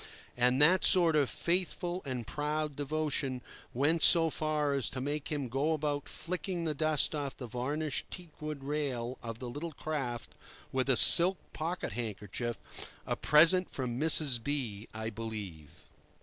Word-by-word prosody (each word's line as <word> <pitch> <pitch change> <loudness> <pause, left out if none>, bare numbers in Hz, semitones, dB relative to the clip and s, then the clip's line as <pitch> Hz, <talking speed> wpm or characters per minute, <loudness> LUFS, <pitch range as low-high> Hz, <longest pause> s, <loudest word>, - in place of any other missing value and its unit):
And 125 +2 +2
that 180 +5 +5
sort 170 -4 +5
of 145 -3 +2
faithful 175 +1 -2
and 125 -3 -4
proud 150 +2 -3
devotion 145 -3 -2 0.3
went 150 +6 +1
so 165 -1 +4
far 150 -2 -1
as 140 -3 +1
to 130 - -6
make 145 +2 -3
him 145 -3 -2
go 140 +6 0
about 145 -2 -3
flicking 175 +2 -4
the 160 -2 -1
dust 155 0 +1
off 145 -3 -4
the 125 - -7
varnished 135 +5 -3
teak 175 -5 -11
wood 150 -2 -6
rail 135 -4 -3
of 115 -1 -6
the 125 - -7
little 150 +6 -6
craft 135 -7 -5 0.4
with 130 0 -1
a 130 - +4
silk 180 +2 +9 0.2
pocket 170 +3 -4
handkerchief—a 110 +1 -5
present 170 +5 +4
from 125 -2 -4
Mrs. 150 -6 +2
B—, 120 -7 -4
I 110 0 -5
believe. 105 -9 -8
145 Hz, 150 wpm, -31 LUFS, 125-155 Hz, 0.4 s, silk